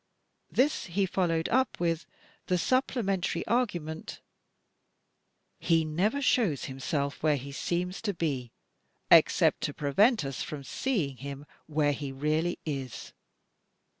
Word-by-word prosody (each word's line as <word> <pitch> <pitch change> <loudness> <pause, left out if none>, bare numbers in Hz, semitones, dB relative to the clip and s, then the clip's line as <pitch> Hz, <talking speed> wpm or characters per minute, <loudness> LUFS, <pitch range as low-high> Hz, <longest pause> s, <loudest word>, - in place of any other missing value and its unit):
This 285 +4 +1
he 190 +3 +1
followed 170 -3 0
up 260 +1 +1
with 170 -1 0 0.4
the 180 - +2
supplementary 195 - 0
argument: 175 -10 -2 1.4
"He 165 -2 +2
never 200 - 0
shows 210 - +2
himself 140 +2 -3
where 155 -1 +3
he 140 +1 -7
seems 180 +5 -2
to 205 -3 -1
be 135 -8 -2 0.6
except - - +5
to - - -2
prevent 195 - +3
us 135 -1 -4
from 145 -2 -5
seeing 150 - -1
him 140 +1 -7 0.2
where 150 -1 +2
he 140 -1 -5
really 155 +5 0
is." 135 -5 -5
165 Hz, 120 wpm, -29 LUFS, 140-195 Hz, 1.4 s, except